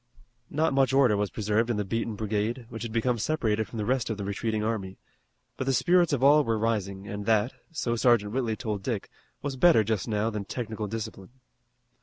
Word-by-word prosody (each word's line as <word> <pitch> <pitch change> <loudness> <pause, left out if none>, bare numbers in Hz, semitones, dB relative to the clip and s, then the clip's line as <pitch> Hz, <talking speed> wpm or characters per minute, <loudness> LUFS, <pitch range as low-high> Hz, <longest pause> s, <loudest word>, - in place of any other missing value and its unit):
Not 155 0 +1
much 135 -1 +3
order 135 -6 +5
was 100 0 0
preserved 110 +2 0
in 115 - 0
the 105 - -1
beaten 115 +2 -2
brigade, 110 +3 -2
which 110 - -7
had 115 -1 -4
become 115 +1 0
separated 110 -6 0
from 115 - -8
the 105 - -2
rest 125 0 0
of 110 - -2
the 100 - -4
retreating 105 +2 -2
army, 100 -4 -3 0.6
but 130 - -3
the 135 - +2
spirits 175 +4 +3
of 135 -3 0
all 145 +2 +7
were 115 -4 0
rising 100 -3 -2
and 100 0 -5
that, 110 +2 +2 0.2
so 120 -7 -1
Sergeant 115 -3 +3
Whitley 120 -4 0
told 105 -4 -3
Dick, 110 -1 -3 0.3
was 140 -2 -3
better 160 -6 +6
just 110 0 -1
now 110 0 0
than 105 -2 -3
technical 110 -1 -4
discipline. 100 -3 -6
115 Hz, 205 wpm, -27 LUFS, 105-125 Hz, 0.6 s, all